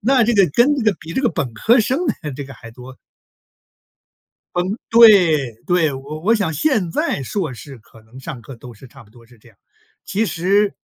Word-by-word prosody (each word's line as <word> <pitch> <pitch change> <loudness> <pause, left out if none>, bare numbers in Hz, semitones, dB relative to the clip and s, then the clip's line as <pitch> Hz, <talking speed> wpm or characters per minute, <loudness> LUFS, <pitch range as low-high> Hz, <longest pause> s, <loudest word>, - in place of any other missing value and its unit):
那 255 +3 +3
这 240 - +1
个 200 -3 +5
跟 260 - +3
这 265 - -2
个 215 - +3
比 165 +1 -9
这 265 - -2
个 245 - +3
本 130 - -4
科 230 - +3
生 260 +7 -1 0.2
的 150 -2 -6
这 140 +2 -7
个 135 - -11
还 115 - -13
多。 125 +2 -13 1.6
嗯， 185 +4 -1
对， 180 - +5
对， 165 -5 +1
我 140 +4 -8
我 215 +8 +2
想 200 -7 -1
现 190 - 0
在 140 - -2
硕 155 - -4
士 135 +2 -12
可 110 0 -20
能 115 +4 -15
上 130 -2 -8
课 135 - -11
都 120 0 -13
是 130 - -15
差 135 +2 -16
不 110 - -23
多 115 +1 -19
是 120 0 -21
这 115 - -21
样， 105 - -24 0.5
其 220 +3 -1
实 195 +3 0
160 Hz, 225 characters per minute, -19 LUFS, 130-210 Hz, 1.6 s, 个